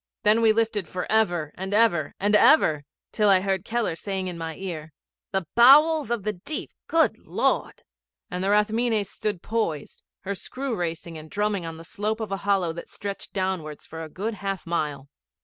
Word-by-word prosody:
Then 215 +2 +4
we 225 -1 +6
lifted 220 -4 0
for 180 +2 -4
ever 175 -9 +2
and 190 +2 -3
ever 185 -10 +3
and 205 +2 +3
ever, 160 - +5 0.3
till 210 -2 +2
I 190 -2 +5
heard 190 -1 -1
Keller 230 -6 -1
saying 190 +2 -3
in 180 - -4
my 165 -1 -5
ear, 160 -5 -6 0.4
'The 190 -2 -1
bowels 295 +4 +6
of 235 -4 -1
the 215 - -1
deep, 210 - -6 0.2
good 325 -1 +2
Lord!' - - 0 0.5
and 180 +1 -3
the 195 - +1
Rathmines 215 0 +2
stood 210 -5 -3
poised, 215 -10 -2 0.2
her 200 +1 -3
screw 255 +5 -4
racing 165 -2 -4
and 155 0 -12
drumming 205 -2 -1
on 165 0 -7
the 165 - -10
slope 210 +5 -3
of 220 -3 -4
a 195 - -1
hollow 195 -4 +1
that 170 - -9
stretched 200 -1 -6
downwards 185 -6 -3
for 160 0 -8
a 160 - -8
good 210 +8 -3
half 195 -2 -4
mile. 150 -5 -2
195 Hz, 185 wpm, -25 LUFS, 170-220 Hz, 0.5 s, we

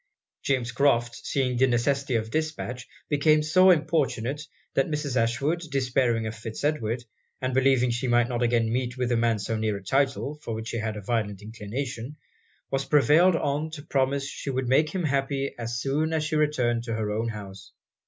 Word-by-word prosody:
James 125 -3 0
Crofts 120 -2 +1
seeing 130 -3 0
the 130 +2 +4
necessity 130 +2 +1
of 110 0 -1
dispatch, 155 -6 -3 0.2
became 150 +1 +3
so 185 +5 +5
importunate, 150 -5 +1 0.3
that 135 - +1
Mrs. 150 -3 -2
Ashwood, 130 +8 +1
despairing 125 -4 +1
of 110 - -3
Fitz 110 +2 -7
Edward, 125 -5 0 0.4
and 130 -2 -2
believing 130 -2 +3
she 120 +2 -2
might 120 0 +3
not 120 -1 -2
again 115 -1 +2
meet 125 0 -2
with 125 -1 -1
a - - +3
man 115 -1 +2
so 110 +2 -3
near 110 -2 -1
a 100 - -11
title, 140 +4 0
for 115 -6 -4
which 110 +1 -5
she 115 - -2
had 110 -1 -3
a - - -6
violent 105 -2 -2
inclination, 115 +5 -5 0.6
was 135 0 0
prevailed 150 +5 +5
on 145 0 -1
to 155 -2 -8
promise 135 -1 0
she 140 - -6
would 130 -1 -1
make 150 +5 +3
him 185 +2 -3
happy 140 -1 -1
as 115 0 -3
soon 150 +5 0
as 155 -1 +1
she 155 0 -2
returned 125 -6 +1
to 115 -2 -2
her 110 -1 -2
own 110 +2 -1
house. 100 -3 -8
130 Hz, 190 wpm, -26 LUFS, 115-145 Hz, 0.6 s, so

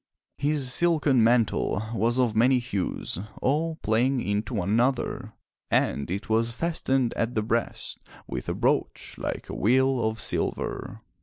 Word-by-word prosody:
His 145 -3 +1
silken 150 -8 +3
mantle 115 -2 +2
was 115 +2 +1
of 120 -4 +1
many 125 +4 +4
hues 110 -8 -3 0.2
all 160 +4 0
playing 125 +5 +2
into 105 +2 -2
one 100 -1 -1
another, 120 +4 0 0.4
and 70 - +1
it 95 +4 -4
was 115 +1 +1
fastened 135 -3 0
at 115 +2 -2
the 110 - +1
breast 115 +2 -2 0.3
with - - -5
a - - -1
brooch - - -1
like - - -4
a - - -7
wheel 130 +3 +2
of 110 0 -1
silver. - - -3
120 Hz, 145 wpm, -26 LUFS, 110-135 Hz, 0.4 s, many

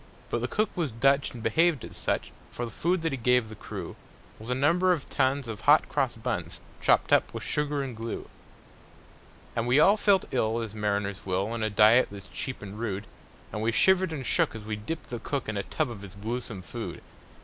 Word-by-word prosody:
But - - +1
the - - 0
cook 215 0 0
was 170 -5 0
Dutch, 135 +5 +2
and 120 -2 -9
behaved 160 +4 +2
as - - -10
such; - - -2 0.2
For 120 - -4
the 115 - -7
food 175 - 0
that 165 - 0
he 135 - -2
gave 125 -1 +3
the 110 - -8
crew - - -7 0.4
Was 110 +2 -9
a 125 - +1
number 170 +7 +3
of 165 -6 -1
tons 135 -1 +1
of 110 -3 -6
hot - - +5
cross - - 0
buns, - - -4 0.2
Chopped - - +3
up - - +4
with - - -4
sugar 150 -1 0
and 130 -3 -5
glue. 115 +1 -5 1.3
And 115 0 0
we 125 +4 +5
all 200 +7 +6
felt 200 -3 +3
ill 115 -2 +1
as 110 -2 -5
mariners 100 -2 -1
will, 95 +3 -1
On 115 -1 -3
a 110 - +1
diet 110 +4 +6
that's 100 -2 -10
cheap 130 -5 -5
and 100 +1 -8
rude; 105 -3 -3 0.5
And 105 - -3
we 115 +1 +2
shivered 190 - +4
and 140 -5 -4
shook - - +2
as 110 - -7
we 105 0 -3
dipped 120 +11 -6
the 120 - -3
cook 140 +2 -3
In 105 - -3
a 100 - 0
tub 145 +6 -2
of 105 -4 -8
his 100 -1 -10
gluesome 110 -2 -5
food. 85 - -6
120 Hz, 220 wpm, -28 LUFS, 105-145 Hz, 1.3 s, all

